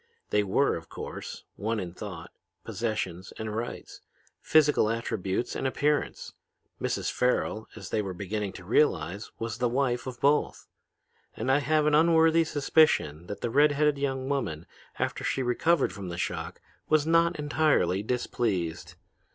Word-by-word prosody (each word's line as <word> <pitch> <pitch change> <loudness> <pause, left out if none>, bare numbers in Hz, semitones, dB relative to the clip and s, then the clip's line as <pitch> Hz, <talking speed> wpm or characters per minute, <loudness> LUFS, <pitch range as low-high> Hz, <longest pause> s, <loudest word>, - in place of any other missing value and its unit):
They 105 - +4
were, 105 +8 +2
of 80 - -12
course, - - -7
one 110 +2 -1
in 90 -3 -5
thought, - - -8 0.3
possessions 100 -6 -3
and 110 -1 -4
rights, 115 +2 -6 0.4
physical 150 -8 +4
attributes 115 -1 -2
and - - -1
appearance. 145 +3 -1 0.5
Mrs. - - -1
Farrel, 125 -3 0
as - - -9
they 110 - +1
were 95 -3 -5
beginning 100 +2 -3
to 90 - -10
realize, 100 - +1
was 115 -1 -4
the 125 -1 +2
wife 125 0 0
of 125 -2 -6
both. 145 +2 +1 0.7
And 130 - 0
I 140 - +4
have 155 +1 +2
an 150 - +3
unworthy 165 +1 +5
suspicion 140 - +2
that 100 +1 -6
the 120 - -2
red 145 +3 +5
headed 150 0 +2
young 135 -2 -2
woman, 105 - -2 0.3
after - - -2
she 135 - 0
recovered 160 +8 +2
from 100 -3 -7
the 85 - -5
shock, - - -4 0.3
was 155 -1 +3
not 165 +1 +3
entirely 145 - +2
displeased. 105 -7 -2
120 Hz, 150 wpm, -28 LUFS, 100-150 Hz, 0.7 s, unworthy